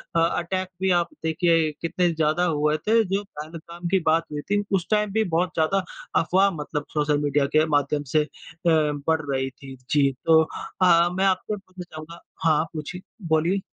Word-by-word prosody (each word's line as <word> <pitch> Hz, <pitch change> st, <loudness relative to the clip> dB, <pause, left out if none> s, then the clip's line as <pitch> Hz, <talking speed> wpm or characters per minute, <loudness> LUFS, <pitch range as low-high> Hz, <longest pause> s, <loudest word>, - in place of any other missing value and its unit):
अ -, -, +4 dB, 0.2 s
attack 185 Hz, +2 st, -2 dB
भी 190 Hz, -1 st, +2 dB
आप 175 Hz, -1 st, +2 dB, 0.2 s
देखिए 160 Hz, -1 st, +2 dB
कितने 175 Hz, +1 st, +1 dB
ज़्यादा 155 Hz, +2 st, +1 dB
हुए 150 Hz, -2 st, +1 dB
थे 225 Hz, +1 st, +5 dB
जो 195 Hz, +1 st, -1 dB
पहलगाम 170 Hz, 0 st, -8 dB
की 190 Hz, -, +4 dB
बात 165 Hz, +1 st, +3 dB
हुई 145 Hz, 0 st, -4 dB
थी। 205 Hz, 0 st, +2 dB
उस 180 Hz, -2 st, -1 dB
टाइम 210 Hz, -1 st, +2 dB
भी 220 Hz, 0 st, +2 dB
बहुत 175 Hz, +1 st, +2 dB
ज़्यादा 185 Hz, +4 st, +1 dB, 0.4 s
अफ़वाह 190 Hz, +4 st, +3 dB
मतलब 150 Hz, -2 st, -4 dB
सोशल 150 Hz, -1 st, +1 dB
मीडिया 145 Hz, 0 st, +2 dB
के 155 Hz, +1 st, +5 dB
माध्यम 145 Hz, +1 st, +1 dB
से 155 Hz, -1 st, +4 dB
अ, -, -, -10 dB, 0.4 s
बढ़ 155 Hz, 0 st, +2 dB
रही 135 Hz, 0 st, -1 dB
थी, 135 Hz, 0 st, -12 dB
जी। 140 Hz, -2 st, +3 dB
तो 160 Hz, -1 st, +6 dB, 0.4 s
अ, 170 Hz, -1 st, +5 dB
मैं 190 Hz, +1 st, +1 dB
आपसे 190 Hz, +2 st, 0 dB
पूछना 185 Hz, -2 st, -11 dB
चाहूँगा 155 Hz, +2 st, -10 dB, 0.2 s
हाँ, 155 Hz, -1 st, +3 dB
पूछिए 160 Hz, +4 st, -6 dB, 0.3 s
बोलिए। 165 Hz, +5 st, +2 dB
165 Hz, 180 wpm, -24 LUFS, 150-185 Hz, 0.4 s, तो